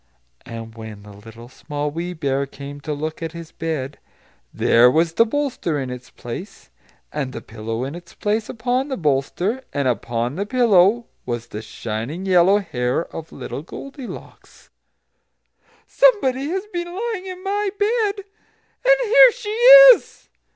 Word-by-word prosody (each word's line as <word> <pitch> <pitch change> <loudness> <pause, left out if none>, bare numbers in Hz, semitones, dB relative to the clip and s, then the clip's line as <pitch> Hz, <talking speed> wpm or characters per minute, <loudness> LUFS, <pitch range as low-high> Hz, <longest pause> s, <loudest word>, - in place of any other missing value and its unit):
And 115 -1 -8
when 110 -2 -10
the 105 0 -13
Little 115 +3 -13
Small 145 +3 -5
Wee 170 +3 -4
Bear 140 -4 -1
came 140 +1 -10
to 150 - -5
look 155 +3 -5
at 165 0 -5
his 170 -1 -9
bed, 145 -4 -4 0.5
there 120 +1 +4
was 160 +4 +1
the 230 +7 +3
bolster 255 - -2
in 130 -2 -4
its 125 0 -9
place; 135 - -9 0.4
and 140 -3 -3
the - - -5
pillow 115 +2 -5
in 135 +2 -5
its 175 0 -12
place 215 +1 -1
upon 245 +4 -1
the 265 - -4
bolster; 170 - -1
and 140 -2 -1
upon 120 - -2
the 200 - -2
pillow 230 -2 +3 0.2
was 120 -1 -4
the 105 - -6
shining, 115 - -5
yellow 185 +1 +5
hair 125 -6 -2
of 165 0 -7
little - - -7
Goldilocks! 270 - -11 1.1
"SOMEBODY 280 - +2
HAS 380 +5 -3
BEEN 345 0 -3
LYING 425 -3 -4
IN 370 0 -8
MY 405 +1 -1
BED, 425 0 +1
AND 465 +4 -2
HERE - - +7
SHE 465 -4 -6 0.4
IS!" - - -9
165 Hz, 150 wpm, -21 LUFS, -, 1.1 s, HERE